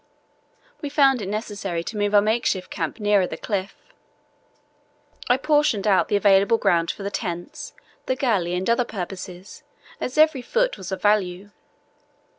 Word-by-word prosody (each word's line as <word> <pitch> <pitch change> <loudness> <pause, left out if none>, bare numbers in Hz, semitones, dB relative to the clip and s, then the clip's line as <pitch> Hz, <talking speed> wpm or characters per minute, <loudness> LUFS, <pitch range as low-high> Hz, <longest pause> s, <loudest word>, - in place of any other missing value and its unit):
We 290 - -4
found 275 -4 +3
it 195 - -4
necessary 200 -5 -4
to 220 - -7
move 205 0 0
our 205 - +6
makeshift 215 -4 0
camp 165 +5 -4
nearer 205 -3 +2
the - - -6
cliff. 200 -1 -3 1.5
I 245 - +5
portioned 295 -8 +1
out 195 -2 +3
the - - 0
available 200 +2 +4
ground 170 -5 +1
for 200 - -5
the 200 - -3
tents, 180 - -5 0.3
the 260 - +1
galley, 200 -10 0
and 185 +1 -2
other 235 +1 +3
purposes, 185 -3 -8 0.4
as 255 - -4
every 310 -4 +4
foot - - 0
was 190 -1 -8
of 190 - -5
value. 205 -1 +1
205 Hz, 155 wpm, -23 LUFS, 185-240 Hz, 1.5 s, our